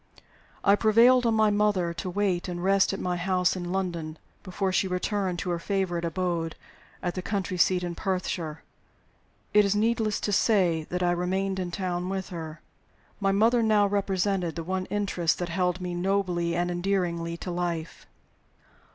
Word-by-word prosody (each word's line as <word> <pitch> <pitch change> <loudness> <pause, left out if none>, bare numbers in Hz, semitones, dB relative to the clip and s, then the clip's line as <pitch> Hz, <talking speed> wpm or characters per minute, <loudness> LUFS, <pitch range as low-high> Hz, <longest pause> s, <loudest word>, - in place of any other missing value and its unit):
I 200 - +6
prevailed 235 +4 +5
on 225 - +2
my 215 -1 +4
mother 205 -5 +1
to 180 - -5
wait 190 -1 0
and 175 -1 -4
rest 195 0 +3
at 195 - -4
my 180 -1 -1
house 180 0 +1
in 175 -1 -4
London 170 -4 -3 0.2
before 190 0 -2
she 190 - +2
returned 185 0 -1
to 180 - -3
her 170 - -1
favorite 185 -2 -1
abode 170 -1 -2 0.5
at 175 -1 -1
the 185 - -4
country 185 -2 -3
seat 180 +1 +3
in 175 -1 -3
Perthshire. 170 -4 -3 0.9
It 210 0 +6
is 200 0 +1
needless 220 0 +1
to 205 - -1
say 185 -7 +2
that 180 0 -2
I 175 - +3
remained 190 +2 -1
in 180 -1 -2
town 180 0 -3
with 190 -1 -3
her. 165 -2 -7 0.6
My 195 -1 +2
mother 225 +4 +3
now 215 -2 +4
represented 195 -3 0
the 165 - -4
one 185 +2 -3
interest 195 -5 0
that 175 0 -3
held 180 +1 0
me 180 -1 -4
nobly 175 -2 0
and 175 +1 0
endearingly 175 -2 -1
to 180 - -5
life. 175 -2 -4
185 Hz, 170 wpm, -27 LUFS, 175-200 Hz, 0.9 s, I